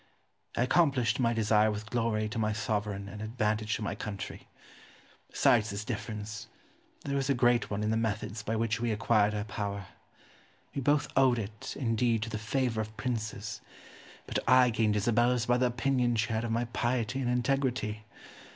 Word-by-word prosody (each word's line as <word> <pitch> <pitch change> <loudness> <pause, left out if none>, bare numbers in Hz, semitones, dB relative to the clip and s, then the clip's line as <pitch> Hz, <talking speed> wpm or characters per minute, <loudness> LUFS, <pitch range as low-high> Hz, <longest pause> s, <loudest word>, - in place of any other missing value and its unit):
I - - +3
accomplished 130 -6 +2
my 120 -2 +3
desire 110 -1 +3
with 105 +1 -5
glory 115 -3 0
to 115 +1 -4
my 105 -1 +1
sovereign 105 -3 -2
and 105 +1 -8
advantage 110 -1 -1
to 110 - -4
my 105 - -2
country. 100 -1 -6 0.8
Besides 115 -2 +3
this 100 +1 -4
difference, 105 -2 -5 0.6
there 140 -1 -1
was 135 -1 0
a 140 - +3
great 120 0 +3
one 105 +1 -2
in 105 - +1
the 110 - +1
methods 110 -1 -2
by 110 +2 -2
which 115 +2 0
we 120 -1 0
acquired 105 -1 +2
our 105 - -1
power. 100 -3 -4 0.8
We 140 - -2
both 145 +2 +2
owed 130 -3 +5
it, 110 +4 -6
indeed, 115 -2 +1
to 110 - -5
the 110 - -3
favour 115 0 0
of 110 0 -7
princes; 110 -5 -3 0.6
but - - -1
I 125 -1 +6
gained 110 -1 +1
Isabella's 120 +3 +2
by 120 0 +3
the 125 0 +3
opinion 125 0 +1
she 105 0 0
had 110 +1 0
of - - -3
my 115 +2 +1
piety 120 +1 -1
and 125 - 0
integrity. 125 -4 0
115 Hz, 180 wpm, -30 LUFS, 105-125 Hz, 0.8 s, I